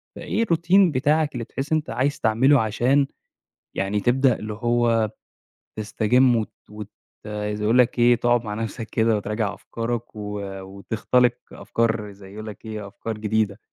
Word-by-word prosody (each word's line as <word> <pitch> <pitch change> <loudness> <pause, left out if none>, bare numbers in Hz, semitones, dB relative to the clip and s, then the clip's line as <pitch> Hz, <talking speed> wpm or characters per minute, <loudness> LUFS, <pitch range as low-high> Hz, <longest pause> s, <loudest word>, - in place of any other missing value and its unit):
فإيه 225 - -1
الروتين 175 0 +4
بتاعك 150 +3 +1
اللي 120 -2 -4
بتحس 135 +6 -6
إن 155 - +4
أنت 155 - -5
عايز 140 +3 0
تعمله 130 +5 +4
عشان 125 +6 +2 0.7
يعني 100 +2 0
تبدأ 125 +1 +3
اللي 105 0 -5
هو 115 -1 +1 0.7
تسْتجم 120 +4 +3
وت 110 -2 -2 0.2
وت 105 0 -8 0.4
زي 105 0 -3
أقول 115 +4 +3
لك 125 0 +3
إيه 120 +1 +6
تقعد 120 0 +2
مع 105 -1 -4
نَفْسَك 115 +1 -4
كده 110 -1 +2
وتراجع 105 0 -2
أفكارك 115 +3 -5
و 105 -1 -5 0.2
وتخْتلق 110 +5 +1 0.2
أفكار 110 -3 -1
زي 95 -1 -14
يقول 110 +1 -7
لك 105 0 -9
إيه، 110 -2 -6
أفكار 110 +2 -6
جديدة. 105 -1 0
115 Hz, 155 wpm, -23 LUFS, 105-125 Hz, 0.7 s, إيه